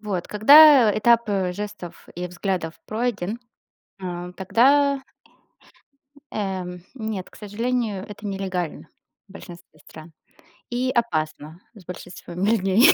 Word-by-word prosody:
Вот. 200 Hz, -5 st, -4 dB
Когда 265 Hz, 0 st, +7 dB
этап, 235 Hz, +1 st, +3 dB
э, 190 Hz, -3 st, 0 dB
жестов 205 Hz, -3 st, -8 dB
и 180 Hz, +1 st, -4 dB
взглядов 180 Hz, -2 st, -3 dB
пройден, 220 Hz, -2 st, -2 dB, 0.6 s
а, 180 Hz, -1 st, -5 dB
тогда 270 Hz, +9 st, +3 dB, 1.3 s
эм, 185 Hz, -3 st, -4 dB
нет, 220 Hz, -6 st, -5 dB
к -, -, -18 dB
сожалению, 215 Hz, -1 st, -3 dB
это 210 Hz, 0 st, -9 dB
нелегально 190 Hz, -4 st, -4 dB, 0.4 s
в -, -, -17 dB
большинстве 175 Hz, -4 st, -13 dB
стран 160 Hz, +1 st, -13 dB, 0.6 s
и 250 Hz, +2 st, -1 dB
опасно 160 Hz, -, -2 dB
с 205 Hz, -5 st, -15 dB
большинством 180 Hz, 0 st, -7 dB
людей. 210 Hz, -, +5 dB
200 Hz, 110 wpm, -23 LUFS, 180-230 Hz, 1.3 s, Когда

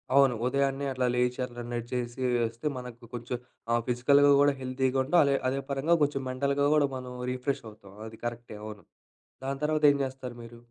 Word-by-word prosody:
అవును. 135 Hz, -3 st, +6 dB
ఉదయాన్నే 140 Hz, +1 st, +1 dB
అట్లా 130 Hz, -1 st, 0 dB
లేచి, 125 Hz, +1 st, +1 dB
అట్లా 120 Hz, -1 st, -9 dB
నడిచేసి 120 Hz, +1 st, -3 dB, 0.3 s
ఒస్తే, 115 Hz, +6 st, -5 dB
మనకు 125 Hz, -1 st, -9 dB
కొంచెం 120 Hz, +1 st, -4 dB, 0.4 s
ఆహ్, 120 Hz, -, +3 dB
ఫిజికల్‌గా 140 Hz, +4 st, +5 dB
గూడా 145 Hz, 0 st, +5 dB
హెల్తీగా 130 Hz, +1 st, 0 dB
ఉంటాం, 170 Hz, +6 st, +3 dB
అలే 140 Hz, -1 st, +3 dB
అదే 135 Hz, +1 st, -1 dB
పరంగా 140 Hz, +5 st, +2 dB
కొంచెం 140 Hz, -2 st, 0 dB
మెంటల్‌గా 140 Hz, +2 st, +1 dB
గూడా 145 Hz, -2 st, +4 dB
మనం, 125 Hz, -1 st, -6 dB, 0.2 s
రిఫ్రెషవుతాం. 110 Hz, -6 st, -5 dB
అది 110 Hz, 0 st, -12 dB
కరెక్టే, 120 Hz, -2 st, -5 dB
అవును. 105 Hz, -1 st, -8 dB, 0.6 s
దాని 135 Hz, 0 st, -2 dB
తర్వాతేం 150 Hz, -2 st, +4 dB
జేస్తారు 130 Hz, -2 st, -5 dB
మీరు? 115 Hz, 0 st, -11 dB
130 Hz, 160 wpm, -29 LUFS, 120-140 Hz, 0.6 s, అవును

